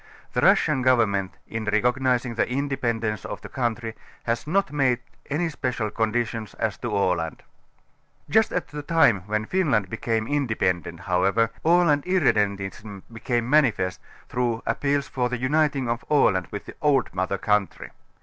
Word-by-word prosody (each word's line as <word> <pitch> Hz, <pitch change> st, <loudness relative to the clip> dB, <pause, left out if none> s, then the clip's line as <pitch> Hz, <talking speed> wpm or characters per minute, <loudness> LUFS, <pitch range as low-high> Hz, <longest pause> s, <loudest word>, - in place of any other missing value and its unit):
The -, -, +1 dB
Russian 150 Hz, -4 st, +4 dB
govern 125 Hz, -4 st, +4 dB
ment 100 Hz, -2 st, -3 dB
in 115 Hz, -1 st, -4 dB
recognizing 125 Hz, +3 st, +1 dB
the 115 Hz, -, 0 dB
independence 120 Hz, -6 st, -1 dB
of -, -, -6 dB
the -, -, -9 dB
countrj', 120 Hz, -2 st, -2 dB, 0.3 s
has 115 Hz, +4 st, -2 dB
not 195 Hz, +3 st, +1 dB
made 135 Hz, -4 st, +2 dB, 0.3 s
any 160 Hz, +4 st, 0 dB
special 125 Hz, -8 st, -2 dB
conditions 115 Hz, 0 st, -2 dB
as 110 Hz, -2 st, -1 dB
to 120 Hz, -, -3 dB
Aland. 90 Hz, -5 st, 0 dB, 0.8 s
Just 220 Hz, +8 st, +3 dB
at 180 Hz, -, -2 dB
the 150 Hz, 0 st, -6 dB
time 145 Hz, -, +3 dB
when 110 Hz, 0 st, -1 dB
Finland 125 Hz, -, +1 dB
became 115 Hz, -1 st, -1 dB
independent, 95 Hz, -, -1 dB
how 90 Hz, -2 st, 0 dB
ever, 110 Hz, +4 st, +2 dB
Aland 165 Hz, -3 st, +4 dB
irredentism 105 Hz, -, 0 dB
became 120 Hz, +1 st, -1 dB
manifest 125 Hz, -10 st, +2 dB, 0.3 s
through 120 Hz, -2 st, -1 dB
appeals 140 Hz, 0 st, 0 dB
for 125 Hz, -2 st, -1 dB
the 125 Hz, -, -2 dB
uniting 140 Hz, +1 st, +1 dB
of 120 Hz, +1 st, -2 dB
Aland 95 Hz, -11 st, +3 dB
with 100 Hz, -, -6 dB
the -, -, -9 dB
old 145 Hz, -3 st, +2 dB
mother 95 Hz, +1 st, -1 dB
country. 105 Hz, -3 st, -1 dB
120 Hz, 150 wpm, -24 LUFS, 105-140 Hz, 0.8 s, Russian